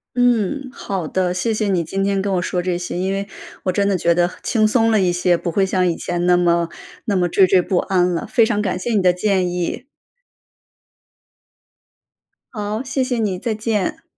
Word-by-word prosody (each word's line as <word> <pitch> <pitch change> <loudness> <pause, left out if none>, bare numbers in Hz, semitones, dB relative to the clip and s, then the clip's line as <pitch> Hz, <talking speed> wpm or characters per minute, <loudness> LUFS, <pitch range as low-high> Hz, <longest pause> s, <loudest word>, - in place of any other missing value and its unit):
嗯， 245 +2 +1
好 190 -9 -4
的， 180 +1 0
谢 215 +5 -1
谢 215 -1 -1
你 175 -3 +1
今 195 +5 -2
天 195 -1 0
跟 195 -1 -1
我 180 - +1
说 180 +1 -2
这 180 -1 -1
些。 175 0 -5
因 190 +1 -1
为 200 0 -3 0.4
我 185 - 0
真 200 +1 +1
的 195 - +1
觉 170 0 +2
得 175 +1 +2
轻 215 -3 +2
松 225 0 +2
了 215 - +3
一 180 -1 +2
些， 175 0 +2
不 170 - -3
会 195 +3 +2
像 185 -2 +1
以 170 - 0
前 175 0 -2
那 180 0 +5
么 170 -1 +2 0.4
那 205 - 0
么 180 -1 +2
惴 185 +2 +4
惴 180 -1 +4
不 185 - -1
安 180 -2 +1
了。 170 - -3
非 230 -3 +3
常 210 -3 0
感 185 -3 -1
谢 225 +5 -3
你 205 - +3
的 180 -1 +5
建 185 0 0
议。 180 +8 -3 2.7
好， 210 +3 -3
谢 270 0 -1
谢 255 -2 -2
你， 200 -5 -1
再 225 0 -2
见。 215 - -2
190 Hz, 225 characters per minute, -20 LUFS, 180-215 Hz, 2.7 s, 那